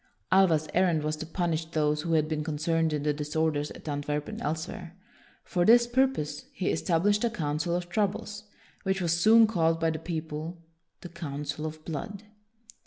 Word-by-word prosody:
Alva's 170 Hz, -5 st, +4 dB
errand 175 Hz, -4 st, +2 dB
was 155 Hz, 0 st, -1 dB
to 160 Hz, -, -6 dB
punish 165 Hz, -1 st, -1 dB
those 150 Hz, -2 st, 0 dB
who 165 Hz, +1 st, -1 dB
had 155 Hz, -1 st, +3 dB
been 155 Hz, -1 st, -2 dB
concerned 160 Hz, +1 st, 0 dB
in 150 Hz, -1 st, -2 dB
the 150 Hz, 0 st, +1 dB
disorders 150 Hz, 0 st, -1 dB
at -, -, -12 dB
Antwerp 145 Hz, 0 st, -2 dB
and -, -, -6 dB
elsewhere. 160 Hz, +3 st, -4 dB, 0.5 s
For 175 Hz, -, 0 dB
this 235 Hz, +5 st, +7 dB
purpose 240 Hz, -, 0 dB
he 190 Hz, -, -1 dB
established 205 Hz, +5 st, +1 dB
a 235 Hz, -, +3 dB
Council 160 Hz, -3 st, -1 dB
of 175 Hz, 0 st, -3 dB
Troubles, 205 Hz, +2 st, -2 dB, 0.4 s
which 190 Hz, 0 st, 0 dB
was 170 Hz, -3 st, +1 dB
soon 220 Hz, +6 st, +6 dB
called 165 Hz, -6 st, +1 dB
by 165 Hz, 0 st, +2 dB
the 155 Hz, -, -4 dB
people 160 Hz, 0 st, -5 dB, 0.4 s
the 175 Hz, -, -8 dB
Council 150 Hz, -2 st, -4 dB
of 155 Hz, 0 st, -9 dB
Blood. 185 Hz, +6 st, -5 dB
165 Hz, 175 wpm, -28 LUFS, 150-180 Hz, 0.5 s, this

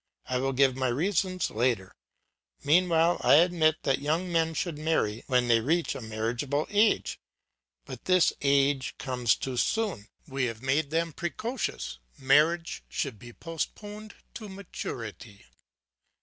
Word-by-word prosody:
I 125 Hz, 0 st, -1 dB
will 135 Hz, +1 st, 0 dB
give 135 Hz, 0 st, +3 dB
my 130 Hz, 0 st, 0 dB
reasons 185 Hz, +7 st, 0 dB
later; 115 Hz, -5 st, 0 dB, 0.7 s
meanwhile 165 Hz, +2 st, +3 dB
I -, -, +6 dB
admit 160 Hz, -1 st, +4 dB
that 135 Hz, -, +1 dB
young 165 Hz, +5 st, -1 dB
men 165 Hz, -1 st, +1 dB
should 165 Hz, -3 st, -3 dB
marry 155 Hz, -9 st, 0 dB
when 125 Hz, -2 st, +2 dB
they 115 Hz, -1 st, +5 dB
reach 160 Hz, +8 st, 0 dB
a -, -, -7 dB
marriageable 115 Hz, +7 st, -2 dB
age. 210 Hz, +1 st, +2 dB, 0.7 s
But -, -, -9 dB
this 185 Hz, -2 st, +4 dB
age 140 Hz, -1 st, +2 dB
comes 125 Hz, -4 st, +1 dB
too 130 Hz, -2 st, -5 dB
soon; 200 Hz, -, 0 dB, 0.2 s
we 135 Hz, -2 st, -1 dB
have 115 Hz, 0 st, -5 dB
made 140 Hz, +3 st, +1 dB
them 165 Hz, +1 st, -1 dB
precocious; 175 Hz, -, -4 dB, 0.2 s
marriage 155 Hz, +6 st, +2 dB
should 130 Hz, -8 st, -3 dB
be 120 Hz, +2 st, -11 dB
postponed 205 Hz, -, -6 dB, 0.2 s
to 215 Hz, -2 st, -8 dB
maturity. 115 Hz, -, -8 dB
145 Hz, 135 wpm, -28 LUFS, 125-170 Hz, 0.7 s, I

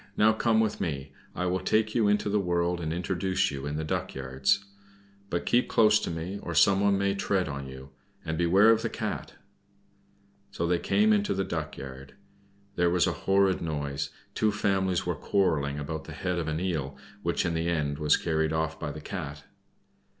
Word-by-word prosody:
now 110 Hz, +1 st, +5 dB
come 110 Hz, 0 st, +2 dB
with 110 Hz, -1 st, 0 dB
me, 70 Hz, -4 st, -3 dB, 0.2 s
I 90 Hz, -, -1 dB
will 90 Hz, +1 st, 0 dB
take 110 Hz, +3 st, +1 dB
you 115 Hz, -3 st, +3 dB
into 105 Hz, +1 st, +2 dB
the 105 Hz, +1 st, +2 dB
world 85 Hz, -1 st, 0 dB
and 80 Hz, -1 st, -2 dB
introduce 95 Hz, +2 st, 0 dB
you 70 Hz, 0 st, -5 dB
in 75 Hz, -, -3 dB
the 80 Hz, -, -2 dB
duck 75 Hz, -, -3 dB
yards. 65 Hz, +8 st, 0 dB, 0.6 s
But 85 Hz, -, -2 dB
keep 120 Hz, +1 st, +3 dB
close 110 Hz, -1 st, +5 dB
to -, -, -4 dB
me, 85 Hz, +4 st, -4 dB
or 85 Hz, -, -5 dB
someone 100 Hz, +5 st, +4 dB
may 100 Hz, 0 st, +1 dB
tread 100 Hz, -2 st, 0 dB
on 70 Hz, -2 st, -5 dB
you; 65 Hz, +1 st, -10 dB, 0.3 s
and 80 Hz, -, -2 dB
beware 95 Hz, +6 st, +5 dB
of 115 Hz, 0 st, +3 dB
the 115 Hz, -, -1 dB
Cat." -, -, -4 dB, 1.1 s
So 85 Hz, -, -3 dB
they 85 Hz, 0 st, +1 dB
came 215 Hz, -, +3 dB
into 205 Hz, -, +1 dB
the 95 Hz, -, 0 dB
duck 80 Hz, -4 st, -4 dB
yard. 65 Hz, 0 st, -9 dB, 0.6 s
There 90 Hz, 0 st, +3 dB
was 90 Hz, 0 st, +3 dB
a -, -, +1 dB
horrid 95 Hz, -1 st, +2 dB
noise; 75 Hz, -4 st, -3 dB, 0.2 s
two 110 Hz, -1 st, +2 dB
families 95 Hz, -3 st, 0 dB
were -, -, 0 dB
quarreling 75 Hz, -8 st, 0 dB
about 75 Hz, +2 st, -5 dB
the -, -, -8 dB
head 90 Hz, -1 st, -2 dB
of 80 Hz, -, -3 dB
an 80 Hz, +1 st, -1 dB
eel, 75 Hz, -7 st, -2 dB, 0.2 s
which 85 Hz, 0 st, 0 dB
in 85 Hz, -, 0 dB
the 80 Hz, +1 st, -1 dB
end 75 Hz, -3 st, -1 dB
was 75 Hz, -1 st, +4 dB
carried 80 Hz, -2 st, 0 dB
off 80 Hz, 0 st, -1 dB
by 75 Hz, -, -3 dB
the 75 Hz, +1 st, -8 dB
Cat. 75 Hz, -5 st, -6 dB
85 Hz, 195 wpm, -28 LUFS, 75-100 Hz, 1.1 s, now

